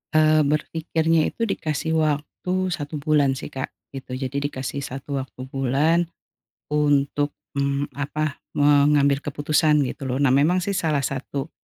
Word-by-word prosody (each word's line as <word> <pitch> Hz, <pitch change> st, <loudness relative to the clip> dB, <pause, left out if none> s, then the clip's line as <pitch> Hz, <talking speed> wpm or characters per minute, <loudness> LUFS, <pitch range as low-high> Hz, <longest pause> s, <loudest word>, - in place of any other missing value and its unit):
Eee, 155 Hz, 0 st, +5 dB
berpikirnya 160 Hz, +1 st, +1 dB
itu 230 Hz, -, -4 dB
dikasih 160 Hz, -6 st, -1 dB
waktu 170 Hz, +5 st, -1 dB
1 150 Hz, -2 st, -4 dB
bulan 145 Hz, -2 st, +2 dB
sih -, -, -7 dB
Kak 130 Hz, -, -3 dB, 0.2 s
gitu. 135 Hz, -2 st, -7 dB
Jadi 130 Hz, +1 st, -3 dB
dikasih 130 Hz, -1 st, -5 dB
1 135 Hz, 0 st, -4 dB
waktu 130 Hz, -1 st, -8 dB
bulan 145 Hz, +6 st, +2 dB, 0.6 s
untuk, 145 Hz, -1 st, +1 dB, 0.2 s
mmm, 140 Hz, +1 st, 0 dB
apa, 145 Hz, +2 st, -3 dB, 0.2 s
mengambil 145 Hz, -1 st, +4 dB
keputusan 150 Hz, +1 st, +2 dB
gitu 135 Hz, +1 st, -4 dB
loh. 130 Hz, 0 st, -1 dB
Nah 130 Hz, -, +4 dB
memang 160 Hz, +7 st, +3 dB
sih 200 Hz, -, -1 dB
salah 160 Hz, -7 st, 0 dB
satu, 140 Hz, +2 st, -4 dB
145 Hz, 140 wpm, -23 LUFS, 140-155 Hz, 0.6 s, Eee